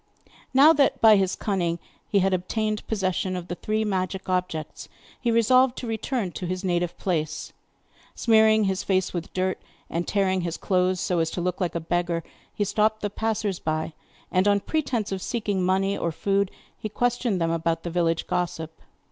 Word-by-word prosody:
Now 280 +5 +7
that 285 -3 +2
by 220 -1 +8
his 190 -1 +1
cunning 175 -5 -1 0.3
he 200 - +2
had 195 - +2
obtained 215 +4 -1
possession 185 -3 -1
of 180 -1 -6
the - - -2
three 215 +4 -1
magic 190 -1 -2
objects, 180 -4 -3 0.3
he 240 - 0
resolved 250 +3 +4
to - - -5
return 225 -2 -2
to 180 - -5
his 185 +2 -3
native 175 -2 0
place. 155 -4 -2 0.6
Smearing 220 -1 +4
his 190 0 0
face 190 -1 0
with 170 -2 -4
dirt, 185 0 -1 0.3
and 170 +1 -2
tearing 190 -2 +1
his 170 -1 -3
clothes 185 -1 +1
so 180 -2 0
as 165 -1 +1
to 175 - -4
look 180 +1 -2
like 175 -2 -1
a - - +1
beggar, 170 0 -1 0.3
he 205 - -1
stopped 215 +2 +1
the 205 - -2
passers 215 -3 -1
by 155 0 -2 0.4
and, 185 +2 +3
on 200 0 +3
pretence 260 -9 -1
of 190 -1 -3
seeking 205 -4 -1
money 190 +2 +1
or 170 - -1
food, 195 +4 0 0.3
he 215 - -4
questioned 240 -2 0
them 165 -1 +1
about 165 0 -1
the 170 - -4
village 165 -1 +1
gossip. 160 -2 -3
190 Hz, 180 wpm, -25 LUFS, 175-215 Hz, 0.6 s, by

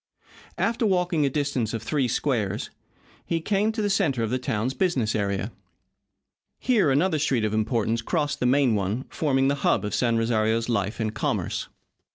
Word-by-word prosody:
After 230 +1 0
walking 180 -7 +2
a - - +1
distance 135 -6 -1
of 115 - -5
three 135 +1 0
squares 115 -7 -1 0.5
he 165 - -1
came 205 +5 +1
to 220 -1 -3
the 205 - +1
centre 150 - +1
of 110 - -2
the 130 - 0
town's 120 +1 -1
business 130 - 0
area. 100 +1 -1 1.1
Here 220 - +2
another 155 +4 +2
street 130 -6 +1
of 105 - -1
importance 115 +1 0
crossed 150 +2 -1
the 125 - +1
main 130 -2 +3
one, 105 +5 -1
forming 135 -3 +1
the 140 - +3
hub - - +2
of 105 - -3
San 120 -2 +2
Rosario's 115 0 +1
life 105 -1 -1
and 110 -1 -1
commerce. - - -2
130 Hz, 175 wpm, -25 LUFS, 110-155 Hz, 1.1 s, main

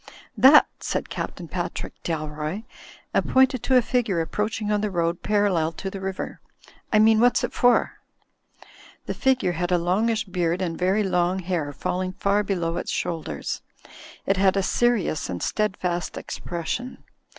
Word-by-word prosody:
*'That!" 285 +3 +8
said - - -3
Captain - - -5
Patrick - - -4
Dalroy, 155 +4 -3 0.5
and - - +1
pointed 260 -2 +4
to 260 - +2
a 250 - +4
figure 225 -8 0
approaching 210 +5 -2
on 210 -1 +1
the 210 - 0
road 170 -2 -1
parallel 200 -6 +1
to 195 +4 -5
the 195 - -7
river, 190 0 -5 0.5
"I 215 - +4
mean, 220 0 +5
what's 245 +1 +4
it - - -2
for?" 245 0 +2 1.1
The - - -3
figure 260 -8 +1
had 175 +1 -2
a 180 - +4
longish 215 +6 +1
beard 180 -3 -1
and 175 -3 -2
very 190 +5 +1
long 180 -1 +1
hair 170 -5 -2
falling 185 +6 -3
far 200 +2 +1
below 175 -5 -2
its - - -4
shoulders. 160 - -3 0.6
It 195 - +1
had 190 0 +3
a 195 - +2
serious 235 -8 +1
and 90 -1 -4
steadfast 185 -4 -1
expression. 175 +9 -5
190 Hz, 155 wpm, -24 LUFS, 170-215 Hz, 1.1 s, That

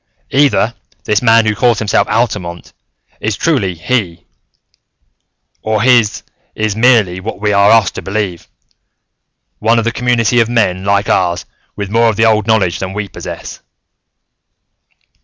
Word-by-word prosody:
"Either 135 -5 +2 0.3
this 105 -1 0
man 115 -2 +4
who 110 - +1
calls 115 +3 +1
himself 105 -1 0
Altamont 100 -7 -3 0.5
is 105 -1 -2
truly 110 - 0
He, 90 -2 -3 1.4
or 110 -1 -1
his 120 -4 +2 0.3
is 110 -1 -1
merely 110 -6 +3
what 105 +3 -6
we 105 0 0
are 100 +1 +4
asked 110 -3 +3
to - - -6
believe, 95 -4 -4 1.1
one 115 +2 +2
of 115 - 0
a 115 - 0
community 120 0 +1
of 115 -1 +2
men 100 -6 0
like 100 0 +1
ours, 85 -1 0 0.3
with 100 -1 -5
more 115 +1 +3
of 110 - -1
the 110 +2 +2
old 110 -1 +2
knowledge 100 -6 +1
than 95 0 -5
we 105 0 -4
possess." - - -8
110 Hz, 145 wpm, -14 LUFS, 100-115 Hz, 1.4 s, man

